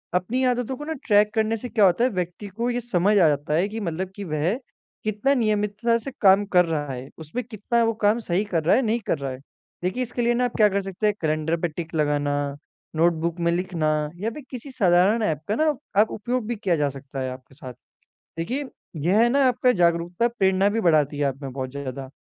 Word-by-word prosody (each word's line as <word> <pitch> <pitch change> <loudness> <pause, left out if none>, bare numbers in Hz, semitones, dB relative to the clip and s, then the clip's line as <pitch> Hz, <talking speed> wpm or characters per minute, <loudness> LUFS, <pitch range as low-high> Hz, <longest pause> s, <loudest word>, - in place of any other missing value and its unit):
अपनी 220 +9 0
आदतों 245 +1 0
को 295 - -7
ना 320 - -3
ट्रैक 210 0 +4
करने 220 +1 +1
से 245 +3 -7
क्या 215 -4 +4
होता 185 +6 +3
है 255 - +4
व्यक्ति 180 +2 -4
को 230 +5 -3
ये 245 0 -1
समझ 205 -4 +1
आ 175 -5 +6
जाता 145 0 0
है 175 +5 +2
कि 220 - -5
मतलब 185 -1 -3
कि 205 - -6
वह 155 +2 0 0.5
कितना 215 +6 +1
नियमितता 215 0 +1
से 270 +4 -7
काम 195 0 +6
कर 180 -1 +6
रहा 150 -4 -2
है, 130 +2 -7
उसमें 160 +11 -5
कितना 230 +1 -1
वो 225 - +1
काम 210 +3 +3
सही 185 -2 0
कर 170 -6 -1
रहा 165 - +4
है, 265 - +3
नहीं 230 0 0
कर - - +1
रहा 135 -1 -3
है। 130 - -6 0.5
देखिए 195 +8 -1
इसके 245 0 -4
लिए 240 0 +2
ना 250 +1 +1
आप 245 - -4
क्या 215 - +6
कर 200 +1 0
सकते 195 +2 -4
हैं 210 - +2
कैलेंडर 155 +1 0
पे 175 - +1
टिक 165 +1 -7
लगाना, 145 -1 +1 0.6
नोटबुक 170 +1 +1
में 170 0 +1
लिखना 175 -3 -1 0.3
या 215 - -1
फ़िर 300 - -9
किसी 260 +1 -7
साधारण 200 0 +3
ऐप 155 -7 0
का 210 - 0
ना 310 +3 +2 0.3
आप 220 - +1
उपयोग 240 +2 -2
भी 240 - -2
किया 195 -5 0
जा 145 -2 +1
सकता 135 0 -8
है 130 - -2
आपके 130 +1 -12
साथ। 130 -4 -9 0.6
देखिए 255 +13 -2 0.4
यह 195 +5 +4
है 235 - +5
ना 275 +2 +3
आपका 250 0 +3
जागरूकता 175 +3 +1
प्रेरणा 195 -4 +2
भी 225 +2 -1
बढ़ाती 150 -4 +3
है - - +1
आपमें 135 0 -3
बहुत 130 -1 -4
ज़्यादा 135 -1 -6
190 Hz, 230 wpm, -24 LUFS, 160-230 Hz, 0.6 s, आ